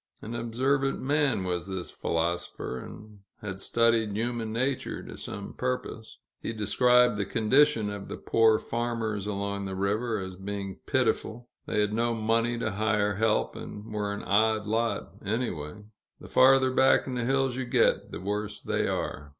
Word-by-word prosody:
An 110 - -6
observant 130 +4 0
man 140 -6 +1
was 90 -1 -2
this 95 -2 -5
philosopher, 85 -5 -2
and 105 +6 -11 0.2
had 95 -2 -6
studied 115 -2 +2
human 115 -1 -2
nature 130 +4 -2
to - - -9
some 100 -1 -7
purpose. 125 -3 -4 0.2
He - - -3
described 125 +3 +4
the 100 - 0
condition 115 0 +3
of 100 -1 -7
the - - -6
poor 115 -1 +4
farmers 115 -4 -2
along 100 -1 -2
the 95 -1 -4
river, 105 +4 0
as 95 -2 -5
being 100 0 -5
pitiful; 120 +2 0 0.2
they 105 - +1
had 105 0 0
no 115 +1 +1
money 115 +2 +1
to 110 -2 -1
hire 105 -1 +1
help, 110 0 +1
and 105 +1 -8
were 105 -1 -1
an 100 - -5
odd 110 +1 +2
lot, 115 +2 -1
anyway 105 -5 -3 0.4
the - - -11
farther 130 0 +5
back 130 0 +4
in 130 - -4
the 125 -1 -1
hills 135 0 +1
you 130 0 -3
get, 120 -1 +2
the - - -5
worse 105 +2 -3
they - - -1
are. 70 - -3
110 Hz, 165 wpm, -28 LUFS, 100-120 Hz, 0.4 s, farther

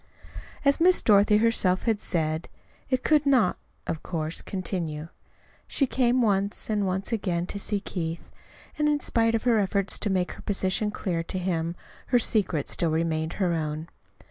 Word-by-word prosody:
As 280 0 +4
Miss 365 +1 +5
Dorothy 210 0 +5
herself 210 -5 +2
had 225 -3 +1
said, 160 -3 -1 0.4
it 255 -1 0
could 305 -2 +4
not, 250 -9 +3 0.3
of 160 - -3
course, 160 -1 -3
continue. 165 -5 -4 0.6
She 275 - +1
came 250 -1 +2
once, 200 0 +1
and 205 -2 +1
once 190 +4 -2
again 180 -6 -1
to 200 - -6
see 205 0 -1
Keith; 165 -4 -5 0.5
and 300 - +3
in 295 -1 +2
spite 230 -4 +1
of 225 - -1
her 235 -3 +3
efforts 200 0 0
to 210 - -1
make 185 -2 0
her - - -10
position 200 +1 0
clear 180 -5 -2
to 185 - -4
him, 170 -2 -1 0.3
her 250 - +4
secret 195 - +1
still 170 - 0
remained 160 0 -1
her 180 -4 0
own. 155 0 -3
195 Hz, 170 wpm, -26 LUFS, 170-225 Hz, 0.6 s, Miss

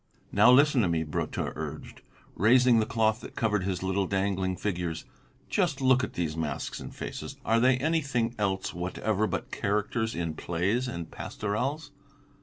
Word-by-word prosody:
"Now 110 +5 +6
listen 140 0 +5
to 100 - +2
me," 85 -1 0
Brotteaux 75 -2 -3
urged, - - -7 0.3
raising 120 +4 +5
the 110 - +1
cloth 110 -1 +1
that - - -10
covered 105 -4 0
his 95 -2 -2
little 95 0 0
dangling 95 -1 0
figures; 90 -4 -3 0.4
"just 175 -8 0
look 130 -1 +4
at - - -3
these 80 -3 -2
masks 80 -2 -3
and - - -8
faces, - - -7
are 115 +1 +3
they 125 +2 +4
anything 140 -5 0
else 95 -2 -1
whatever 100 +4 -1
but - - -4
characters 105 +3 -1
in 85 -2 -2
plays 95 +11 -1
and 85 -9 -6
pastorals? 135 +9 -3
105 Hz, 160 wpm, -28 LUFS, 95-125 Hz, 0.4 s, Now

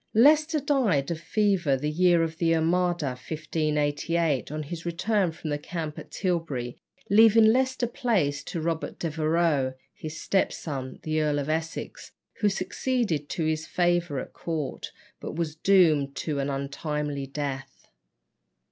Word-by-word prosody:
Leicester 305 +6 +5
died 235 - +1
of 165 - -3
fever 190 -9 +1
the 145 +3 -3
year 175 +1 +4
of 160 0 -4
the 165 -1 +3
Armada 170 -1 +1
(1588), 150 +1 -1
on 155 0 -3
his 165 +3 -7
return 180 +2 0
from 160 -1 -6
the 145 - -1
camp 155 -1 -5
at - - -11
Tilbury, 160 -10 -2 0.4
leaving 220 +1 +7
Leicester 260 +2 +3
Place 205 - 0
to 170 - -4
Robert 165 0 -2
Devereux, 155 -4 +1 0.2
his 155 0 -7
step 195 - +1
son, 135 -4 -5
the 155 0 0
Earl 150 -1 +1
of 145 +1 -2
Essex, 160 +1 -4 0.3
who 210 -2 +3
succeeded 190 - -1
to 165 - -2
his 155 0 -1
favour 175 -4 +1
at - - -8
court, 155 -5 -4 0.3
but - - -6
was 160 -2 -2
doomed 160 -6 +3
to 150 -3 -2
an 140 +1 -1
untimely 140 +1 -3
death. 135 -1 -5
160 Hz, 145 wpm, -27 LUFS, 145-180 Hz, 0.4 s, leaving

